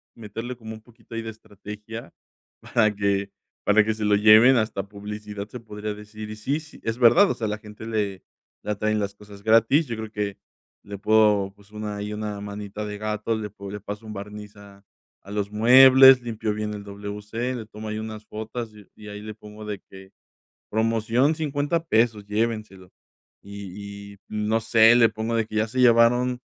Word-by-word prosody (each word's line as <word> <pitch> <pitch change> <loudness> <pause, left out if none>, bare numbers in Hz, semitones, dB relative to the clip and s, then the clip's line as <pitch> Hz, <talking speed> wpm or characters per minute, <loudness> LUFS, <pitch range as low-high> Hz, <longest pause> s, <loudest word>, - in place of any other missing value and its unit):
meterle 115 +3 -6
como 110 -1 -9
un 110 - -11
poquito 115 0 -18
ahí 115 - -3
de 115 - -6
estrategia 105 +1 -10 0.5
para 110 -2 +2
que 100 -1 0 0.3
para 105 +1 +5
que 110 +1 0
se 110 -1 -3
lo 105 - +4
lleven. 110 +5 +7
Hasta 110 -4 -1
publicidad 105 0 -7
se 125 - -8
podría 105 -1 -6
decir. 105 +1 -9
Y, 110 - -7
sí, 135 +7 -1
s 155 -1 -8
es 115 +1 -2
verdad, 130 - +6
o - - +1
sea, 110 - -3
a - - -2
la 105 - -2
gente 105 +1 -11
le 105 -4 -2 0.4
le 105 - -2
atraen 110 +1 0
las 100 -1 -2
cosas 100 -1 -14
gratis, 115 +8 +4
yo 115 -3 -4
creo 110 0 -7
que 105 -2 -3 0.4
le 100 0 -7
puedo, 105 -2 +3
pues, 100 0 -21
una 105 -1 -5
ahí, 105 +1 -4
una 105 -1 -4
manita 105 +1 -6
de 105 0 -5
gato. 110 +1 -2
Le 105 -1 -4
podría 100 +1 -8
le - - -25
paso 105 +2 -7
un 110 - -7
barniz 105 +1 -9
a 100 -1 -16 0.4
a 100 - -13
los 105 -1 -2
muebles, 130 +3 +8
limpio 115 -2 -3
bien 105 0 -3
el 100 -1 -7
WC, 105 +5 -5
le 115 - -6
tomo 110 0 -9
ahí 110 - -3
unas 110 -1 -7
fotos 110 +2 -6
y 105 -2 -15
y 105 -1 -11
ahí 105 0 -8
le 110 0 -7
pongo 105 0 -11
de 105 -2 -5
que: 95 0 -15 0.6
"Promoción 115 +6 +1
$50 150 +2 -1
pesos, 110 -4 +2
llévenselos". 105 -3 -3 0.5
Y 100 0 -9
y, 100 - -17
no 105 +1 0
sé, 115 +1 +6
le 115 -2 +6
pongo 110 +1 -3
de 115 -1 +1
que 110 - -9
ya 110 +1 +1
se 130 +3 -4
llevaron, 125 +1 +4
105 Hz, 200 wpm, -24 LUFS, 105-115 Hz, 0.6 s, muebles